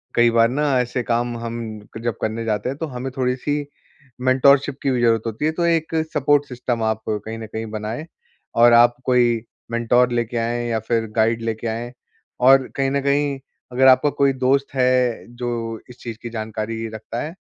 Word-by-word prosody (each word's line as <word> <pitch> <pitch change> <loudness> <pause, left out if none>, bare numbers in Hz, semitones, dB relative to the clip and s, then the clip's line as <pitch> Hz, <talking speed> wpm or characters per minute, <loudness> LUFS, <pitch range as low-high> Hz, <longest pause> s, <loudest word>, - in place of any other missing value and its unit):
कई 120 0 +5
बार 115 0 +4
ना 145 +4 -1 0.2
ऐसे 125 0 -3
काम 120 0 -1
हम 115 0 -5 0.4
क - - -7
जब 120 -2 -2
करने 115 +1 -2
जाते 105 +2 -1
हैं, 135 - -5
तो 165 - -2
हमें 130 0 -5
थोड़ी-सी 130 +3 -1 0.6
मेंटरशिप 135 +2 +4
की 135 - +2
भी 125 -2 0
जरूरत 115 -2 +3
होती 115 +7 -3
है 155 - +2
तो 170 - +1
एक 165 -1 +1 0.2
सपोर्ट 145 0 +3
सिस्टम 120 -2 -3
आप 110 0 0
कहीं 110 +1 -3
न 110 - -6
कहीं 110 0 -3
बनाए 110 +7 -4 0.5
और 120 0 +6
आप 120 +1 +6
कोई 120 -2 +3 0.3
मेंटर 120 +1 +3
लेके 120 0 -1
आएँ 120 +1 -1
या 115 - 0
फिर 115 +1 -1
गाइड 115 +1 +2
लेके 115 0 -3
आएँ, 115 +2 -4 0.5
और 130 +1 +6
कहीं 135 -1 +1
न 140 0 0
कहीं 140 0 +1 0.3
अगर 130 +1 +4
आपका 130 +3 +6
कोई 135 -1 +4
दोस्त 135 +2 +1
है 125 -2 +2
जो 115 -2 -3
इस 125 - -13
चीज़ 115 -2 -6
की 120 - -4
जानकारी 110 0 -4
रखता 110 +2 -5
है, 160 +3 -5
120 Hz, 190 wpm, -21 LUFS, 115-130 Hz, 0.6 s, और